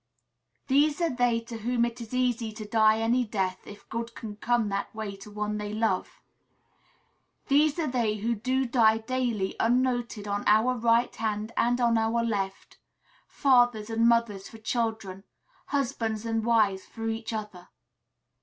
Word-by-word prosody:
These 290 +3 +3
are 335 -7 0
they 245 -2 +2
to 230 0 -8
whom 235 +1 +1
it 235 0 -5
is 225 - -9
easy 245 -3 0
to 215 0 -7
die 220 0 +4
any 240 +3 +2
death, 190 -4 -3
if 205 - -12
good 230 0 -5
can 215 -2 -7
come 230 0 0
that 200 +2 -3
way 215 -2 -5
to 195 +2 -12
one 210 0 -3
they 210 0 -4
love. 220 -4 -1 1.3
These 290 +2 +4
are 330 - 0
they 235 -6 0
who 225 +3 -1
do 255 +4 0
die 230 -3 +4
daily 230 -4 -2
unnoted 240 -3 0
on 205 0 -2
our 220 +4 +4
right 235 0 +2
hand 215 0 -2
and 245 +1 +2
on 235 -2 +3
our 225 +1 +1
left, 195 -4 -3 0.5
fathers 245 -5 +2
and 230 +1 +3
mothers 230 -5 0
for 225 - -12
children, 220 -4 -3 0.4
husbands 235 -6 -2
and 225 -1 -1
wives 215 -5 +2
for 225 0 -7
each 225 0 -3
other. 210 -5 -6
225 Hz, 160 wpm, -27 LUFS, 215-245 Hz, 1.3 s, die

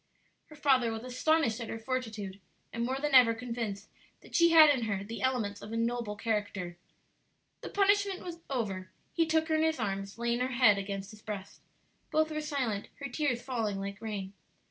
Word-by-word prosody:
Her 305 - -13
father 265 -5 +3
was 225 +1 -5
astonished 255 -1 +1
at 230 - -5
her - - -4
fortitude, 225 -5 -4 0.3
and 230 - -2
more 260 +2 -1
than 295 +1 -2
ever 245 -3 +7
convinced 225 -4 -4 0.3
that - - -17
she 340 0 +6
had 315 -2 +9
in 255 -5 0
her 200 -3 -2
the 225 +3 -7
elements 225 -6 0
of 215 - -8
a 230 - -2
noble 230 -2 -1
character. 205 -5 -2 0.9
The - - -6
punishment 395 -4 +1
over, 195 -8 -2 0.2
he 330 -1 +2
took 320 0 +2
her - - +2
in 315 - +3
his 320 0 +2
arms, 195 -1 -3
laying 235 0 0
her 255 +1 -1
head 225 -5 +5
against 195 0 -5
his 215 -1 -14
breast. 200 -2 -7 0.5
Both 315 0 +2
were 305 0 -2
silent, 260 -9 -2
her 280 -2 -6
tears 250 -2 -1
falling 225 -6 -2
like 200 0 -5
rain. 200 -3 -4
235 Hz, 190 wpm, -31 LUFS, 205-285 Hz, 0.9 s, had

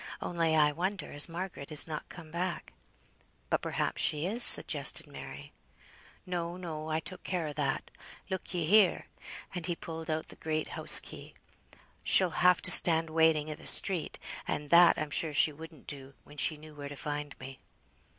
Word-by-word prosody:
Only 165 -2 -1
I 150 -1 +3
wonder 185 +6 -4
as 145 +3 +1
Margaret 170 -4 -7
is 150 - +1
not 155 -2 -7
come 165 -3 -12
back." 175 +2 -5 0.8
"But - - +1
perhaps - - -3
she 150 +1 +1
is," 225 +6 +3
suggested - - +6
Mary. - - -11 0.7
"No, 175 -1 -5
no, 160 -3 -7
I 155 0 -1
took 185 +3 -10
care 175 -4 -3
o' - - -7
that. 140 -2 -3 0.4
Look 190 -1 -6
ye 175 -3 -2
here!" 200 +2 +3 0.5
and 175 -2 -5
he 175 - -2
pulled 165 0 -9
out 155 0 -3
the - - -13
great 155 -1 -4
house - - +3
key. - - -12 0.7
"She'll 185 -3 +3
have 180 -1 +4
to - - +4
stand 165 -1 +6
waiting 160 -1 +1
i' - - -3
th' - - -4
street, 180 -5 +2 0.3
and 145 -1 -5
that 170 0 +6
I'm 155 -1 -5
sure 155 0 -1
she 155 - +3
wouldn't 160 0 -13
do, 135 -1 -7
when 145 - -17
she 155 +1 +1
knew 155 +1 -14
where 145 -1 -9
to 145 - -9
find 145 0 -6
me." 135 0 -11
160 Hz, 180 wpm, -29 LUFS, 150-175 Hz, 0.8 s, suggested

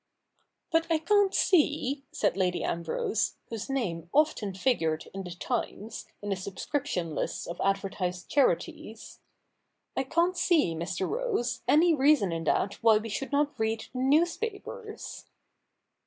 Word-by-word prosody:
' - - -46
But 325 0 +2
I 325 - +4
can't 400 +4 +3
see,' 295 -7 +2
said - - +1
Lady 185 -2 0
Ambrose, 170 +6 -1
whose 225 +1 -5
name 175 -11 -2
often 275 -10 +2
figured 165 -9 0
in 195 - -4
the 180 - -7
Twies, 220 +3 -4 0.2
in 205 - -3
the - - +2
subscription 190 - -3
lists - - -3
of 170 - -6
advertised 195 -2 -1
charities 220 - -1 0.3
— - - -49
' - - -52
I - - +1
can't 340 +7 +1
see, 335 - +3
Mr. 170 +3 -2
Rose, 465 - -1
any 330 +3 +5
reason 280 - +4
in 165 0 -3
that 195 +5 0
why 225 -2 +6
we 220 +1 -4
should 270 +7 -4
not 290 +1 +2
read 220 0 0
the 255 - -4
newspapers.' 405 - -1
230 Hz, 150 wpm, -29 LUFS, 185-305 Hz, 0.3 s, why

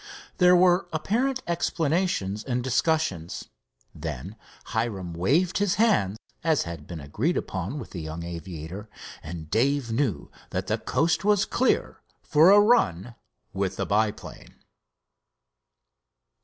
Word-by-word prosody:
There 180 0 +7
were 180 +1 +4
apparent 240 - 0
explanations 165 - 0
and 125 -2 -2
discussions. 130 - -1 0.4
Then 90 - -6 0.4
Hiram 105 -7 -2
waved 150 - +1
his 205 -3 +2
hand 180 - +2 0.3
as 160 -3 +2
had 85 -3 -8
been 85 -2 -6
agreed 105 - -1 0.2
on 95 - -3
with - - -8
the 90 - -6
young 80 +2 -6
aviator, 85 +3 -7 0.3
and 80 -1 -8
Dave 130 +2 +1
knew 115 - -1 0.2
that - - -3
the - - -1
coast 170 +3 +1
was 205 0 +3
clear 255 - 0 0.2
for 155 +4 +5
a 205 +1 +8
run 125 - +3 0.4
with 95 0 -1
the - - -2
biplane. 105 +1 -2
120 Hz, 125 wpm, -26 LUFS, -, 0.4 s, a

